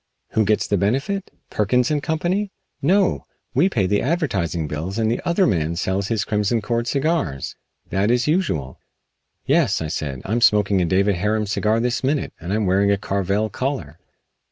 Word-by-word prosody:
Who 110 - +1
gets 105 +2 +2
the 100 - +1
benefit? 140 - -1 0.2
Perkins 125 +6 +1
& - - -3
Co.? 160 +2 -1 0.6
No! 185 +6 +2 0.3
We 185 - +3
pay 105 - +1
the 100 +2 +1
advertising 95 - -1
bills 80 +7 -4
and 110 -1 +1
the 120 - -1
other 185 +3 +3
man 85 - 0
sells 95 +3 -1
his 110 -3 -1
Crimson 105 +2 +1
Cord 115 +2 -2
cigars. 140 - -1 0.4
That 100 +3 +1
is 120 0 +2
usual." 150 - -1 0.7
"Yes," - - +2
I 80 - -3
said, 70 -4 -4
"I'm 115 +5 0
smoking 105 -3 +4
a - - +2
David 95 +3 +2
Harum 105 +3 0
cigar 105 +2 +1
this 120 +2 -1
minute, 140 +2 0
and 85 +2 -5
I - - +1
am 110 -1 0
wearing 95 +2 +3
a 100 - +3
Carvel 100 +2 -1
collar." 130 - -3
105 Hz, 180 wpm, -22 LUFS, 95-125 Hz, 0.7 s, smoking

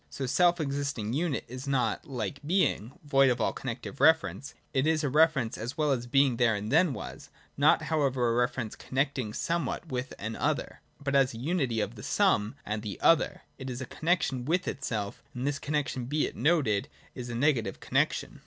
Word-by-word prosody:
The 135 - -2
self 175 +5 +3
existing 140 -7 -2
unit 155 0 -1
is 130 +3 -8
not, 135 -2 0
like 125 -1 -4
Being, 145 - +1
void 135 -2 +4
of 120 -1 0
all - - +1
connective 125 +2 -6
reference: 160 -3 +3 0.2
it 135 +3 +2
is 160 -1 +2
a 145 - +1
reference, 150 -5 +3
as 120 +7 -5
well 150 -2 +2
as 120 -2 -1
Being 135 -1 +3
there 115 -3 +3
and 105 +2 -4
then 180 -6 +4
was, - - -8 0.3
not - - +4
however 135 -6 +1
a - - +1
reference 120 -2 -1
connecting 130 -4 -2
somewhat 170 +6 -2
with 125 +1 -3
an 110 +2 -4
other, - - -2 0.2
but, 140 -1 -3
as 135 -3 +3
unity 130 -3 0
of - - -3
the - - -10
some 105 +2 +1
and 105 0 -2
the 105 -3 -6
other, 165 - +3 0.2
it 130 -1 -5
is 125 -1 -5
a 130 - -4
connexion 155 -5 0
with 175 +7 0
itself, 110 -8 -3
and 125 +2 -3
this 145 0 -1
connexion 140 -4 -2
be 150 +4 0
it - - -6
noted 130 -8 +2 0.3
is 125 -1 -7
a 120 - -4
negative 120 -6 +1
connexion. - - -1
135 Hz, 190 wpm, -29 LUFS, 120-150 Hz, 0.3 s, void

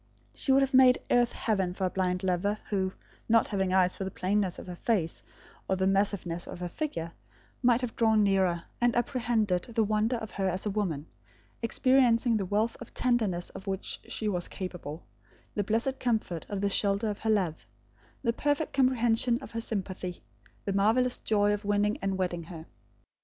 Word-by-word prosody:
She 270 - 0
would 270 +1 +5
have 270 +1 -2
made 255 -1 +7
earth 240 -1 +4
heaven 190 -5 -1
for 190 - -1
a - - +1
blind 180 0 -1
lover 190 +3 0
who, 190 -2 0 0.4
not 230 0 +4
having 190 -3 0
eyes 185 -1 +3
for - - -4
the 190 - -3
plainness 190 0 0
of - - -8
her 180 -1 -7
face 175 -4 -1 0.5
or 190 - +3
the 190 0 0
massiveness 195 -3 0
of - - -7
her 180 0 -4
figure, 170 - -4 0.5
might 245 -1 +4
have 250 -3 -4
drawn 220 -2 +4
nearer, 190 -4 +2 0.2
and 240 -1 +3
apprehended 230 -7 +1
the 225 - +4
wonder 215 +3 +1
of 220 -2 -5
her 195 -1 -1
as 185 +3 -3
a 210 - 0
woman, 180 -8 -2 0.6
experiencing 240 -1 +3
the 195 -3 -2
wealth 215 +4 +1
of 240 - -10
tenderness 215 -9 0
of 195 +1 -10
which 190 0 -2
she 220 - -3
was 180 -4 -1
capable, 180 -4 -7 0.5
the 205 - 0
blessed 230 +6 0
comfort 215 -9 -1
of 200 -1 -3
the 200 - +2
shelter 200 +2 +2
of 205 - -7
her 220 - -2
love, 185 -7 0 0.6
the 230 -2 +2
perfect 290 +4 0
comprehension 240 -2 +2
of 275 - -10
her 230 - -3
sympathy, 190 -5 -4 0.4
the 200 - -1
marvellous 225 +6 +2
joy 205 -1 +2
of 205 +1 -3
winning 205 +1 +1
and 195 -1 -1
wedding 175 -3 -2
her. 165 -2 -9
205 Hz, 185 wpm, -29 LUFS, 185-230 Hz, 0.6 s, made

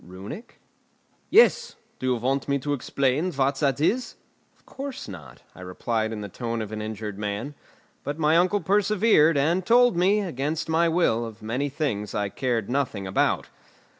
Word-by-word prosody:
"Runic?" 95 - -10 0.7
"Yes. 460 +3 +4 0.2
Do 130 - -3
you 125 - +2
want 130 +4 -1
me 140 - +2
to 145 +2 -2
explain 140 +5 0
what 135 0 +1
that 140 -2 +1
is?" 235 - 0 0.4
"Of - - -34
course 275 -1 -7
not," 75 - -11
I - - -13
replied 110 +5 -2
in 110 -1 -5
the 105 - -5
tone 115 +3 -4
of 110 -1 -5
an 110 0 -4
injured 105 -1 -5
man. 105 +7 -4 0.5
But 145 +1 -4
my 155 0 +3
uncle 185 +4 +3
persevered, 200 -5 +3
and 165 +7 +1
told 245 +2 +4
me, 195 +4 +3
against 155 -3 -3
my 165 +1 +2
will, 160 -9 +2
of 110 -2 -9
many 125 +6 -2
things 130 -9 -3
I 100 -1 -1
cared 120 -2 -2
nothing 125 -7 -2
about. 95 - 0
135 Hz, 170 wpm, -25 LUFS, 110-170 Hz, 0.7 s, Yes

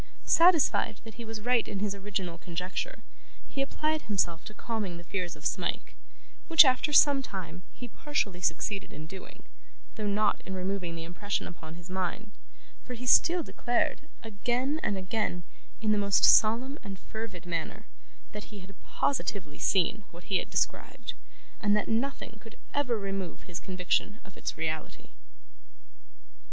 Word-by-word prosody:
Satisfied 335 -3 +5
that 225 -1 -10
he 235 - -8
was 225 -1 -6
right 245 +1 +2
in 200 - -4
his 200 0 -1
original 195 -4 -4
conjecture, 180 - -4 0.4
he 275 - -4
applied 305 +3 0
himself 175 -6 0
to 215 - -8
calming 210 -7 -3
the 170 - -10
fears 175 -1 -3
of - - -14
Smike, - - -1 0.5
which, 325 -2 +9
after 260 +3 +3
some 285 -1 +6
time, 180 -7 -6
he 245 - -8
partially 215 -8 -2
succeeded 195 +4 -1
in 155 - -8
doing, 190 +3 -11 0.5
though 215 -1 -2
not 205 +1 +2
in 190 - -5
removing 185 -2 -2
the 165 - -5
impression 185 +4 -3
upon 160 -2 -9
his 175 0 -11
mind; 190 +3 -3 0.5
for 250 - -6
he 250 +2 -7
still 340 +6 +5
declared, 245 +5 -1
again 245 +7 -1
and 200 - 0
again, 185 -2 -2 0.4
in 215 -1 +2
the 210 - +3
most 200 -1 +3
solemn 245 +6 +5
and 195 -1 -7
fervid 210 -4 -7
manner, 170 -1 -3 0.5
that 210 - -7
he 210 - -11
had 190 +2 -12
positively 200 - -1
seen 195 +3 +2
what 175 +1 -13
he - - +6
had - - -3
described, - - -1 0.5
and 205 -1 +4
that 210 - -1
nothing 230 -1 -2
could 225 +1 -14 0.2
ever 260 -5 +1
remove 195 -3 -4
his 175 -1 -6
conviction 185 +3 0
of 190 - -15
its - - -4
reality. 155 -1 -4
205 Hz, 160 wpm, -30 LUFS, 180-240 Hz, 0.5 s, which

